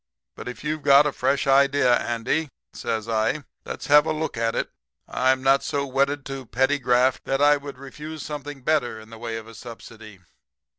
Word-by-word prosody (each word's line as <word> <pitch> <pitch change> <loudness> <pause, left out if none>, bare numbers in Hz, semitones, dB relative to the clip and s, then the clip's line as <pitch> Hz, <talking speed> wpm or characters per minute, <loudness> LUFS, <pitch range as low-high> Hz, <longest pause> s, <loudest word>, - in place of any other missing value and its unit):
But - - -9
if 125 - -7
you've 155 0 -2
got 140 +1 +6
a 150 - +1
fresh 140 0 0
idea, 140 -2 +4
Andy,' 120 +8 -1 0.2
says 110 -1 -3
I, 115 +6 0 0.2
'let's - - -6
have 150 +2 +5
a - - +1
look 155 +1 -3
at 115 0 -1
it. - - -2 0.4
I'm 130 0 +1
not 135 +1 +4
so 140 -2 -1
wedded 140 +1 0
to 135 -2 -7
petty 135 +5 +1
graft 125 0 +2
that 135 0 0
I 145 +1 +5
would 140 -2 -9
refuse 150 +3 -8
something 145 -2 -7
better 130 -7 0
in 110 +1 -15
the 115 - -11
way 115 -1 -4
of 110 - -8
a 115 - -12
subsidy.' 110 -3 -11
135 Hz, 195 wpm, -24 LUFS, 120-145 Hz, 0.4 s, got